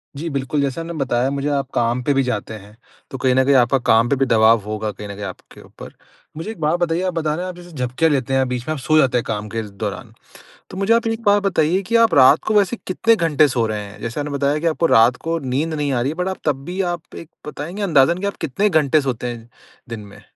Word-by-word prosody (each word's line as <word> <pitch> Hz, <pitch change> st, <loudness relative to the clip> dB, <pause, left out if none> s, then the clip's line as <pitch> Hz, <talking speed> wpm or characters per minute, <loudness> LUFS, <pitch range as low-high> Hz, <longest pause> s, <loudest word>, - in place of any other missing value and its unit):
जी 165 Hz, +4 st, -4 dB
बिल्कुल। 140 Hz, 0 st, -2 dB
जैसा 140 Hz, +4 st, -2 dB
आपने 170 Hz, +1 st, -6 dB
बताया 130 Hz, -4 st, 0 dB
मुझे 140 Hz, +1 st, -2 dB
आप 140 Hz, -2 st, -1 dB
काम 120 Hz, +1 st, 0 dB
पे 145 Hz, -, +1 dB
भी 135 Hz, 0 st, +2 dB
जाते 110 Hz, -3 st, -3 dB
हैं। 105 Hz, +2 st, -16 dB, 0.3 s
तो 135 Hz, -, -5 dB
कहीं 130 Hz, 0 st, +1 dB
न 130 Hz, -, +4 dB
कहीं 140 Hz, +1 st, +4 dB
आपका 125 Hz, +1 st, +4 dB
काम 115 Hz, +1 st, +4 dB
पे 140 Hz, -, +2 dB
भी 135 Hz, -, +1 dB
दबाव 115 Hz, -1 st, +4 dB
होगा 110 Hz, 0 st, -3 dB
कहीं 105 Hz, 0 st, -9 dB
न 100 Hz, -, -7 dB
कहीं 105 Hz, -, -8 dB
आपके 95 Hz, -, -11 dB
ऊपर। -, -, -13 dB, 0.4 s
मुझे 165 Hz, -, -5 dB
एक 205 Hz, -, -11 dB
बात 155 Hz, +3 st, +1 dB
बताइए 170 Hz, 0 st, 0 dB
आप 180 Hz, -, -2 dB
बता 155 Hz, -2 st, -1 dB
रहे 175 Hz, +3 st, -4 dB
हैं -, -, -4 dB
आप 180 Hz, -, -8 dB
जैसे 175 Hz, 0 st, -13 dB
झपकियाँ 135 Hz, +3 st, 0 dB
लेते 135 Hz, -2 st, -1 dB
हैं 135 Hz, 0 st, +2 dB
बीच 125 Hz, 0 st, -4 dB
में 155 Hz, -, 0 dB
आप 155 Hz, -, -6 dB
सो 155 Hz, +5 st, +2 dB
जाते 130 Hz, -5 st, +3 dB
हैं 120 Hz, -, -1 dB
काम 105 Hz, -1 st, -3 dB
के 115 Hz, +2 st, -3 dB, 0.2 s
दौरान। 100 Hz, -3 st, -5 dB, 0.6 s
तो 185 Hz, -, -9 dB
मुझे 195 Hz, +4 st, +2 dB
आप 230 Hz, 0 st, +1 dB
एक 225 Hz, 0 st, -2 dB
बात 205 Hz, -1 st, +4 dB
बताइए 180 Hz, -1 st, +1 dB
कि 230 Hz, -, +1 dB
आप 230 Hz, -5 st, +4 dB
रात 140 Hz, +3 st, +6 dB
को 220 Hz, -, +1 dB
वैसे 205 Hz, +2 st, +3 dB
कितने 225 Hz, +5 st, +2 dB
घंटे 155 Hz, -5 st, +3 dB
सो 120 Hz, -4 st, 0 dB
रहे 105 Hz, -1 st, -3 dB
हैं? 100 Hz, 0 st, -12 dB
जैसे 115 Hz, +5 st, -4 dB
आपने 145 Hz, 0 st, -3 dB
बताया 140 Hz, +1 st, 0 dB
कि 170 Hz, -, -5 dB
आपको 165 Hz, +1 st, +1 dB
रात 120 Hz, -4 st, +5 dB
को 165 Hz, 0 st, 0 dB
नींद 140 Hz, +4 st, -2 dB
नहीं 145 Hz, -2 st, -1 dB
आ 125 Hz, -3 st, 0 dB
रही 130 Hz, -, 0 dB
है 160 Hz, -, -7 dB
बट -, -, -4 dB
आप 190 Hz, -, -3 dB
तब 135 Hz, -1 st, -1 dB
भी 185 Hz, +2 st, -3 dB
आप 175 Hz, -1 st, -10 dB
एक 165 Hz, -, -10 dB, 0.2 s
बताएँगे 165 Hz, +7 st, -6 dB
अंदाज़न 170 Hz, -3 st, +3 dB
कि 200 Hz, -, -3 dB
आप 200 Hz, -, -4 dB
कितने 195 Hz, +9 st, 0 dB
घंटे 155 Hz, -3 st, +3 dB
सोते 125 Hz, -3 st, -3 dB
हैं 115 Hz, 0 st, -13 dB, 0.4 s
दिन 115 Hz, -1 st, -5 dB
में? 100 Hz, -, -15 dB
140 Hz, 275 wpm, -20 LUFS, 120-165 Hz, 0.6 s, रात